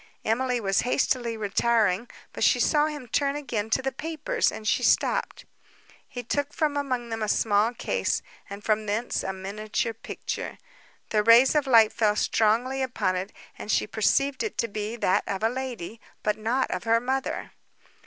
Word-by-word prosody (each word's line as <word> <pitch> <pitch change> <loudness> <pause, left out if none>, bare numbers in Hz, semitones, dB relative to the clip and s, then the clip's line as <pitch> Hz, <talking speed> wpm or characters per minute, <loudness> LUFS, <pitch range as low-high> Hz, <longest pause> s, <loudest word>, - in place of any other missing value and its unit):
Emily 250 +2 +1
was 195 -3 +1
hastily 245 -2 0
retiring; 215 0 +1 0.2
but - - -3
she - - +4
saw 300 -1 +3
him 295 -5 -6
turn 280 +4 0
again 240 -7 -3
to 265 - +1
the 270 - -1
papers, 310 +3 -1
and 215 - -7
she - - +2
stopped. - - +1 0.6
He 245 -2 -7
took 285 +4 -2
from 300 -2 0
among 255 -4 -2
them 225 -1 -4
a 215 - 0
small 210 +1 +2
case, - - -1 0.3
and 200 +1 -8
from 215 0 0
thence 220 +4 -1
a 190 - -3
miniature 210 +4 -3
picture. 225 - -6 0.5
The 215 - +3
rays 230 +4 +6
of 295 -2 +1
light 225 -4 +6
fell 210 -2 +2
strongly 235 +6 +1
upon 245 -7 -1
it, 185 +2 -4 0.3
and - - -8
she - - +2
perceived 265 +6 +1
it 435 - -3
to 230 - 0
be 210 +1 -4
that 185 -5 +1
of 195 +1 -3
a 225 - +4
lady, 235 -4 -6 0.2
but 210 -1 +1
not 235 +5 -1
of - - -4
her 230 0 +4
mother. 260 +2 -3
230 Hz, 175 wpm, -26 LUFS, 215-260 Hz, 0.6 s, rays